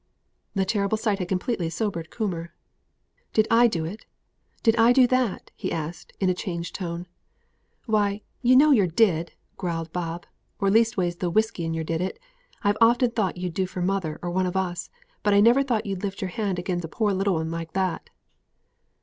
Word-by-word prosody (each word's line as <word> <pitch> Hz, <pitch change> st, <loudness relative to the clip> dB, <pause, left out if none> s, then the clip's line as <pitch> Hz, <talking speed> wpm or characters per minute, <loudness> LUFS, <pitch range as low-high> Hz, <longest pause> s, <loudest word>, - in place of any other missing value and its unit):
The 195 Hz, -1 st, +2 dB
terrible 200 Hz, +1 st, 0 dB
sight 215 Hz, -2 st, 0 dB
had 180 Hz, -, -2 dB
completely 180 Hz, -1 st, -1 dB
sobered 170 Hz, -1 st, -3 dB
Coomber. 175 Hz, -7 st, -3 dB, 0.8 s
"Did 215 Hz, 0 st, +3 dB
I 235 Hz, +1 st, +6 dB
do 165 Hz, -8 st, -2 dB
it? 195 Hz, +7 st, -8 dB, 0.6 s
Did 225 Hz, -1 st, +4 dB
I 230 Hz, +2 st, +6 dB
do 260 Hz, 0 st, +6 dB
that?" 250 Hz, -5 st, 0 dB
he -, -, -4 dB
asked, 160 Hz, +1 st, -5 dB
in 190 Hz, -, +1 dB
a 185 Hz, -, +3 dB
changed 170 Hz, -2 st, -5 dB
voice. 170 Hz, -2 st, -4 dB, 0.8 s
"Why, 210 Hz, -2 st, +1 dB, 0.2 s
yer 255 Hz, 0 st, +5 dB
know 295 Hz, +3 st, +7 dB
yer 210 Hz, -9 st, +5 dB
did," 170 Hz, -2 st, +2 dB, 0.2 s
growled 165 Hz, -3 st, -3 dB
Bob; 170 Hz, -1 st, -4 dB, 0.3 s
"or 195 Hz, -2 st, +1 dB
leastways 210 Hz, -6 st, +2 dB
the 180 Hz, -, -1 dB
whisky 215 Hz, -2 st, +1 dB
in 165 Hz, 0 st, -2 dB
yer 160 Hz, -, -2 dB
did 165 Hz, +1 st, -2 dB
it. 185 Hz, -, -3 dB, 0.5 s
I've 205 Hz, 0 st, +2 dB
often 240 Hz, +1 st, +5 dB
thought 205 Hz, -6 st, -1 dB
you'd 180 Hz, -1 st, -3 dB
do 190 Hz, +2 st, 0 dB
for 180 Hz, -1 st, -4 dB
mother, 180 Hz, -5 st, -1 dB
or 175 Hz, -, -2 dB
one 185 Hz, +1 st, +1 dB
of 180 Hz, +1 st, -2 dB
us; 175 Hz, -2 st, -2 dB, 0.3 s
but 205 Hz, -1 st, +3 dB
I -, -, +6 dB
never 235 Hz, +6 st, +6 dB
thought 240 Hz, -5 st, 0 dB
yer'd 195 Hz, -2 st, -3 dB
lift 200 Hz, -1 st, -4 dB
yer 190 Hz, -, -2 dB
hand 195 Hz, -1 st, -2 dB
agin 175 Hz, 0 st, -2 dB
a -, -, -4 dB
poor 205 Hz, +5 st, 0 dB
little 195 Hz, -2 st, +1 dB
'un 160 Hz, 0 st, -2 dB
like 165 Hz, -1 st, -5 dB
that." 185 Hz, -3 st, -1 dB
190 Hz, 195 wpm, -25 LUFS, 170-220 Hz, 0.8 s, know